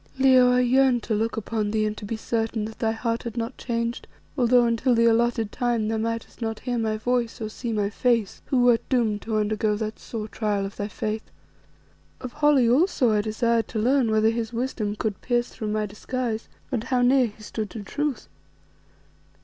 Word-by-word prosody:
"Leo, 260 -2 +6
I 250 - +4
yearned 250 -1 +3
to 225 - -2
look 220 +2 -1
upon 215 -1 -2
thee 215 0 +1
and 210 0 -2
to - - -7
be 220 +2 -3
certain 225 -1 -2
that 220 0 -9
thy 225 -1 +1
heart 230 +1 -2
had 235 0 -7
not 230 +2 -3
changed, 235 0 -3 0.3
although 245 -2 +4
until 235 +2 +2
the 230 0 +4
alloted 230 -1 +2
time 240 -3 0
thou 225 - 0
mightest 230 +2 -4
not 225 -1 -3
hear 245 -2 -2
my 220 -1 0
voice 240 +1 -1
or 215 -2 -4
see 235 +2 -5
my 210 -2 0
face 230 -3 0
who 255 -3 +2
wert 240 -2 +5
doomed 225 -5 +1
to 220 -1 -2
undergo 215 0 +1
that 215 0 -4
sore 215 -2 -6
trial 210 -2 -1
of 195 - -7
thy 205 - -3
faith. 215 +1 -4 0.9
Of 255 - -7
Holly 295 -5 +4
also 255 - +3
I 210 -1 +2
desired 225 +2 0
to 220 - -3
learn 250 +1 +3
whether 220 0 +3
his 230 -1 -3
wisdom 230 -4 -2
could 210 -2 -3
pierce 240 -1 0
through 215 - -6
my 215 0 0
disguise, 225 +2 -4 0.2
and 235 -4 -2
how 250 -1 +1
near 255 0 +4
he 215 0 -13
stood 215 0 -4
to 205 +3 -7
truth. 290 +6 -3
230 Hz, 200 wpm, -25 LUFS, 215-245 Hz, 0.9 s, Leo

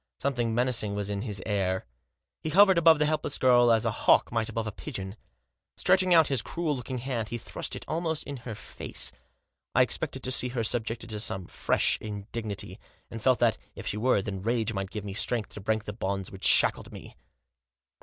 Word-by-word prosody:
Something 120 -5 -1
menacing 120 -4 +1
was 105 0 -2
in 100 -1 -2
his 100 -5 -4
air. 95 -3 0 0.6
He 155 - -3
hovered 190 +2 +6
above 165 -1 +7
the 150 - +2
helpless 150 -1 0
girl 120 -2 +5
as 115 -1 +3
a - - +2
hawk - - +3
might 115 -1 -1
above 115 0 -3
a 110 - -3
pigeon. 95 -5 -7 0.6
Stretching 185 -1 +3
out 165 -2 +7
his 135 -4 +1
cruel 165 +1 -2
looking 130 0 -5
hand 120 -3 -3
he 120 - -4
thrust - - -5
it - - -7
almost 160 -1 -1
in 140 - -6
her 115 -2 -7
face. - - -5 0.6
I - - +7
expected - - -2
to 130 - -2
see 125 - +1
her 120 -2 -2
subjected 115 0 -2
to 105 - -3
some 95 -3 -3
fresh - - +1
indignity, 105 -1 -5 0.3
and 115 - -6
felt 130 +2 +4
that, 115 -3 +3 0.2
if - - -8
she 105 - -2
were, 110 -3 +2
then 95 -2 -4
rage 110 +1 0
might 95 -2 -3
give 105 -1 -6
me 100 - -5
strength 115 +1 -1
to 105 - -7
break 110 +2 0
the 105 - -6
bonds 95 -2 -3
which 95 - -7
shackled - - +4
me. - - -11
115 Hz, 205 wpm, -28 LUFS, 105-130 Hz, 0.6 s, above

